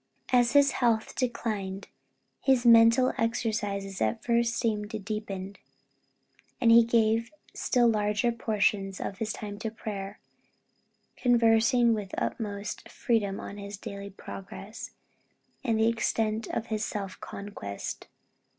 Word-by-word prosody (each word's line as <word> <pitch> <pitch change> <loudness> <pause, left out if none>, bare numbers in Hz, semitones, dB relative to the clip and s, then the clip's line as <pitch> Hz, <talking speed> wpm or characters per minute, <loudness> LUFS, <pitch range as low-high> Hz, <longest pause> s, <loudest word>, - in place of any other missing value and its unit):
As 245 0 +4
his 285 -1 +6
health 230 -3 +1
declined, 210 -6 -3 0.5
his 260 -3 +2
mental 230 +2 +6
exercises 210 -4 -1
at 110 0 0
first 235 -1 +2
seemed 210 -2 -2
deepened; 200 -2 -5 1.0
and 230 - +5
he 235 0 +8
gave 230 0 +2 0.2
still 245 -2 +2
larger 210 +1 +1
portions 205 -4 0
of 190 - -5
his 220 -1 -2
time 205 -1 -6
to 225 - -3
prayer, 205 -2 -6 1.0
conversing 235 0 +4
with 210 -3 -3
the - - -2
utmost 205 -2 -4
freedom 205 -4 0
on 200 - -7
his 200 0 -7
daily 200 0 -7
progress, 195 +1 -9 0.7
and 230 -4 +1
the 220 - +4
extent 225 -1 0
of 225 - -3
his 215 0 -1
self 195 -3 -4
conquest. 195 - -6
220 Hz, 125 wpm, -28 LUFS, 200-230 Hz, 1.0 s, he